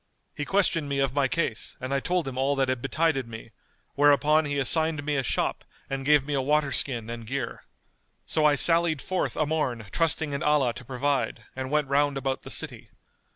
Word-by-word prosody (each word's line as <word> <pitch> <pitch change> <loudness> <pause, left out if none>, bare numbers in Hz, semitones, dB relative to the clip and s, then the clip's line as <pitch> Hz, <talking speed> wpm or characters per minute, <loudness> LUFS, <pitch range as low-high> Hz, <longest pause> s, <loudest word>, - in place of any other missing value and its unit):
He 145 - -4
questioned 170 -6 +1
me 140 - -1
of 135 -2 +1
my 140 -1 +2
case 125 -6 -2
and 130 +2 -4
I 140 - +2
told 180 +1 -1
him 135 - -5
all 135 +2 +1
that 135 -1 +1
had 130 -2 -1
betided 135 -1 0
me, 115 0 -10 0.4
whereupon 145 +2 +4
he 145 -1 -2
assigned 155 +2 +1
me 150 0 0
a 135 - +1
shop 125 - -1 0.3
and 135 0 -2
gave 145 -1 +4
me 145 - -3
a 135 - +1
water 145 +1 +1
skin 120 -4 -1
and 115 0 -6
gear. 130 -1 -4 0.6
So 155 - 0
I 150 -1 +5
sallied 165 +1 +4
forth 185 +7 -2
a 155 - +2
morn 135 -7 -2
trusting 160 -2 +1
in 140 - -3
Allah 150 -6 +2
to 125 - -9
provide, 135 +3 -1
and 130 0 -4
went 150 -1 +1
round 140 0 +2
about 135 -1 -2
the - - -10
city." - - -6
140 Hz, 205 wpm, -26 LUFS, 130-150 Hz, 0.6 s, I